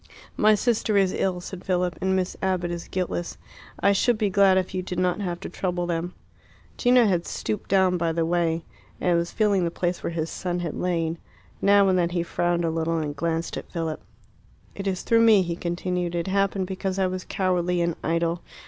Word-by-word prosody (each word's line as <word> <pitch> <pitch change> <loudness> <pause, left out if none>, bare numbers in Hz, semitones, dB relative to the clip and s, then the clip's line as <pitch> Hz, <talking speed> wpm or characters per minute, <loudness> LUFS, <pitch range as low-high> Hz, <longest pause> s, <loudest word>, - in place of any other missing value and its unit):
"My 215 0 +5
sister 220 -2 +1
is 190 -2 +3
ill," 185 -2 0
said 185 +1 -8
Philip, 180 -2 0
"and 190 0 +1
Miss 185 -1 -1
Abbott 185 -2 0
is 170 0 -5
guiltless. 180 -2 -3 0.4
I 200 - +5
should 230 +4 +2
be 210 -3 0
glad 195 -1 +5
if 185 -1 -1
you 185 - -1
did 180 -1 -5
not 180 +2 +1
have 175 -3 -3
to - - -5
trouble 175 -1 -2
them." 175 +1 -3 0.6
Gino 245 -1 +4
had 180 -4 +1
stooped 210 - -4
down 190 -2 +3
by 170 -1 0
the 165 0 0
way, 165 -1 0 0.4
and 175 -1 +2
was 170 0 0
feeling 205 -4 +2
the 170 - +1
place 175 +1 -2
where - - -2
his 160 -1 -2
son 180 -1 -3
had 170 -3 -3
lain. 165 -2 -1 0.4
Now 200 0 +5
and 185 -1 +3
then 170 -1 +2
he 175 -1 -1
frowned 175 0 0
a 165 - 0
little 165 0 -1
and 150 -2 -3
glanced 165 +2 -2
at - - -8
Philip. 165 -3 -3 0.7
"It 200 0 -5
is 185 -2 -2
through 230 0 +4
me," 220 -4 +6
he 170 -1 -3
continued. 175 0 -2
"It 170 -1 -1
happened 195 0 +1
because 190 0 -3
I 190 - +2
was 185 0 -3
cowardly 180 -2 0
and 170 -1 0
idle. 170 +1 0
180 Hz, 210 wpm, -25 LUFS, 170-190 Hz, 0.7 s, me